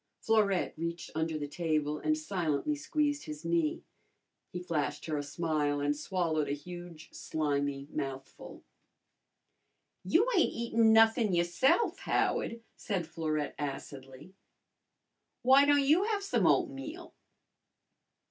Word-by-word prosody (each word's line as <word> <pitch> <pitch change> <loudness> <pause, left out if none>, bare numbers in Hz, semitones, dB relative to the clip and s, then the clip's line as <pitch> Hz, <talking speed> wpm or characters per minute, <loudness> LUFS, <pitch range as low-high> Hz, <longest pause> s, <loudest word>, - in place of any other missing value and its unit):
Florette 210 -4 +1
reached 170 0 -4
under 160 0 -1
the 145 -1 -4
table 150 -1 -1
and 310 0 +1
silently 190 - -1
squeezed 295 -1 -1
his 150 +1 -8
knee. 165 -2 0 0.7
He 180 - -4
flashed 165 -5 -2
her 155 - -2
a 145 - -1
smile 145 -1 -1
and 145 +1 0
swallowed 160 -1 -1
a - - 0
huge 175 +1 -9
slimy 145 -2 -2
mouthful. 135 -2 -6 1.4
"You 395 +9 +3
ain't 355 - +3
eatin' 230 -1 +2
nothin' 225 -1 +5
yourse'f, 265 - +2
Howard," 230 0 -1
said 190 -5 -3
Florette 155 -2 -3
acidly. 135 +2 -7 1.1
"W'y 270 +2 +7
don' 290 -1 +4
you 315 +8 +4
have 420 -2 -1
some 395 - +1
oatmeal?" 330 +1 -1
170 Hz, 120 wpm, -31 LUFS, -, 1.4 s, W'y